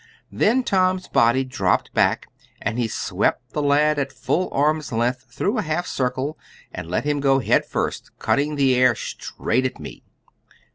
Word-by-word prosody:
Then 250 +4 +2
Tom's 185 -3 +1
body 120 +3 +3
dropped 115 -8 0
back, - - +2 0.3
and 115 - -2
he 120 - +1
swept - - -1
the 150 - -2
lad 145 +1 +3
at 140 -1 -2
full 160 +8 -1
arm's 150 +1 +1
length, 125 +3 -1
through 200 - -1
a - - +2
half 160 +3 -2
circle, 130 +4 -2 0.3
and 90 -3 -7
let 90 - -1
him 145 -1 0
go 135 -1 +3
head 135 - +2
first, - - -3
cutting 150 +2 0
the 135 -2 +3
air, 125 -1 +4
straight 130 +4 -2
at - - -10
me. - - -9
140 Hz, 170 wpm, -22 LUFS, 125-155 Hz, 0.3 s, air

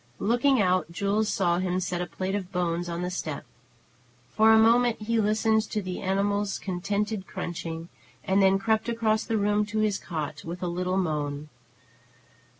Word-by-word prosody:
Looking 245 +4 +2
out, 185 -3 +2
Jules 205 +4 0
saw 175 -2 +1
him 185 0 0
set 180 -1 -2
a 180 - -3
plate 185 +3 -4
of 190 -2 -3
bones 175 -1 -1
on 170 +1 -3
the 180 - -2
step. 160 -5 -4 0.9
For 220 +1 +6
a 220 - +7
moment 235 +1 +4
he 230 +1 +1
listened 220 +1 +2
to 215 - -1
the 185 -2 -5
animal's 200 +1 0
contented 200 +2 -2
crunching, 165 -1 -5 0.4
and 195 +1 +2
then 195 0 +5
crept 220 +3 0
across 220 -2 +1
the 225 -1 0
room 205 0 +2
to 215 +1 -4
his 215 -2 +1
cot, 155 -3 -5
with 175 +2 -6
a - - 0
little 180 +2 -1
moan. 150 -4 -2
195 Hz, 170 wpm, -27 LUFS, 175-215 Hz, 0.9 s, a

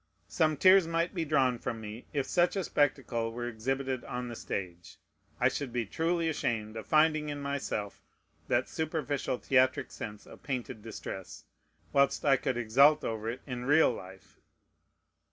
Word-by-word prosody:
Some 155 -3 +1
tears 185 +1 +6
might 165 +1 0
be 170 -4 -2
drawn 135 -5 +2
from 115 - -4
me, 110 +2 -8
if 140 -3 -1
such 175 +6 +2
a 195 - 0
spectacle 130 -7 0
were 120 +1 -4
exhibited 130 +3 -2
on 125 0 -4
the 120 - -6
stage. 90 -5 -6 0.4
I - - +4
should 140 -4 -3
be 120 -1 -1
truly 165 - 0
ashamed 115 -8 -2
of 110 - -7
finding 155 -1 +3
in 145 -1 -4
myself 140 -7 -3 0.5
that - - +1
superficial, 150 -5 -2
theatric 130 0 +2
sense 105 -1 -7
of - - -14
painted 125 -4 -4
distress, 100 -4 -8 0.5
whilst 140 +1 +3
I 140 -2 +6
could 125 -1 -2
exult 135 +6 +5
over 110 0 -3
it 125 +3 -5
in 125 -2 -5
real 145 +1 +5
life. 95 -2 -12
130 Hz, 160 wpm, -30 LUFS, 115-150 Hz, 0.5 s, tears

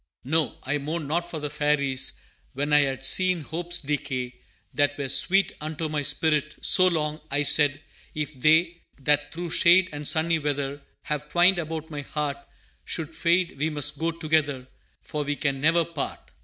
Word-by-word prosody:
No; 155 +3 0
I 145 +3 -1
mourned 155 +2 -4
not 170 +3 -2
for 165 - -5
the 150 -1 -5
Fairies 145 -3 0 0.4
When 145 +2 -2
I 150 - +7
had 135 -2 -1
seen 185 +2 +2
hopes 175 +4 -2
decay, 135 -4 -3 0.4
That 145 0 +1
were 140 -2 -3
sweet 195 +7 +3
unto 155 +1 -4
my 150 -1 -1
spirit 150 +1 +1
So 185 - +6
long; 155 -3 -1
I 145 +1 +1
said, 145 -1 +4 0.4
'If 150 -1 -3
they, 165 +3 +3 0.2
That 145 +1 +1
through 170 +1 -5
shade 185 +2 +5
and 145 0 -2
sunny 165 0 +2
weather 145 -1 -3 0.2
Have 150 0 -4
twined 175 +3 +4
about 160 -1 -5
my 145 -1 -5
heart, 145 -1 -3 0.5
Should 160 -1 -4
fade, 170 -3 +1
we 155 +2 +1
must 145 -1 -1
go 165 +1 0
together, 155 -5 -1 0.4
For 150 -1 -3
we 145 0 -2
can 140 -2 -2
never 165 +2 +3
part!' 165 -3 -6
150 Hz, 170 wpm, -25 LUFS, 145-165 Hz, 0.5 s, I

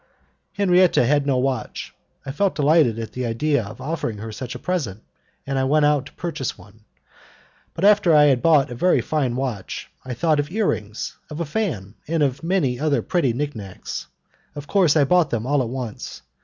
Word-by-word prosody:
Henriette 185 -3 +4
had 140 +3 +3
no 135 -2 +2
watch. 130 0 -2 0.3
I 135 - -4
felt 195 +7 0
delighted 150 -6 +3
at 115 -1 -5
the 125 - -4
idea 125 +3 0
of 105 +4 -10
offering 135 -6 -3
her 110 +2 -7
such 125 +3 -6
a - - -4
present, 125 - -3 0.4
and 135 0 -1
I - - +1
went 150 +2 +3
out 145 -2 +2
to - - -16
purchase 165 -8 -4
one, 105 +4 -18 0.9
but 175 - 0
after 205 -4 +5
I 150 - +7
had 135 -4 +4
bought 150 -6 +4
a - - -3
very 180 +10 +3
fine 135 -6 -1
watch, 125 -7 -4
I 125 -1 -5
thought 155 +3 +2
of 145 0 -1
ear 215 +2 0
rings, 105 +1 -4
of 150 - -7
a 170 - -1
fan, 140 - -3
and 160 -1 +1
of 135 -2 0
many 165 -9 0
other 150 -1 +1
pretty 170 -9 +1
nicknacks. 115 -7 -5 0.5
Of 145 -1 -7
course 175 -3 +3
I 145 - +5
bought 170 +2 +3
them 115 -2 -2
all 145 +1 +2
at 120 - -2
once. 125 -4 -6
140 Hz, 195 wpm, -22 LUFS, 120-160 Hz, 0.9 s, I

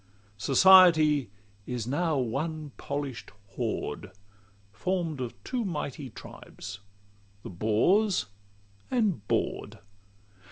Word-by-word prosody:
Society 155 - +6 0.4
is 125 -3 -3
now 155 +4 0
one 150 +5 -3
polish'd 140 -3 -5 0.2
horde, - - -4 0.6
Form'd 170 - -2
of 120 -2 -5
two 250 -2 -2
mighty 150 - -4
tribes, 95 -3 -10 0.6
the - - -7
Bores 110 - +2 0.6
and 205 - 0
Bored. - - -2
150 Hz, 85 wpm, -28 LUFS, 120-180 Hz, 0.6 s, Society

